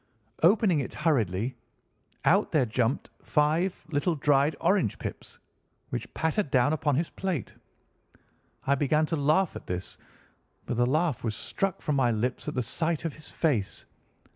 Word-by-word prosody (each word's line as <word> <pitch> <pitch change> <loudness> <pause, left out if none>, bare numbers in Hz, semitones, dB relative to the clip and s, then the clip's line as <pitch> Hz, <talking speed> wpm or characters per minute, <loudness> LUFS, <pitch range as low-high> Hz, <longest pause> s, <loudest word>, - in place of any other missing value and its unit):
Opening 185 -1 +4
it 135 - -4
hurriedly, 115 - 0 0.7
out - - +4
there 145 -5 +3
jumped 120 +3 -1
five 155 +4 +1
little 160 +3 +1
dried 145 +1 +3
orange 180 - +2
pips, - - -7 0.5
which - - -4
pattered 160 +2 0
down 130 +3 +3
upon 150 -2 +1
his 160 +4 -1
plate. 180 - -3 1.1
I 140 - +3
began 150 +3 +2
to 165 - -1
laugh 155 +5 +2
at - - -9
this, 90 +1 -4 0.7
but 120 - -3
the 120 0 +3
laugh 155 0 +1
was 110 -3 -1
struck 195 - -2
from 150 -2 0
my 130 -3 +3
lips 120 +3 -1
at - - -3
the 125 - 0
sight 160 +6 -1
of 165 - -2
his 155 -1 -9
face. 125 - -1
145 Hz, 155 wpm, -28 LUFS, 125-165 Hz, 1.1 s, Opening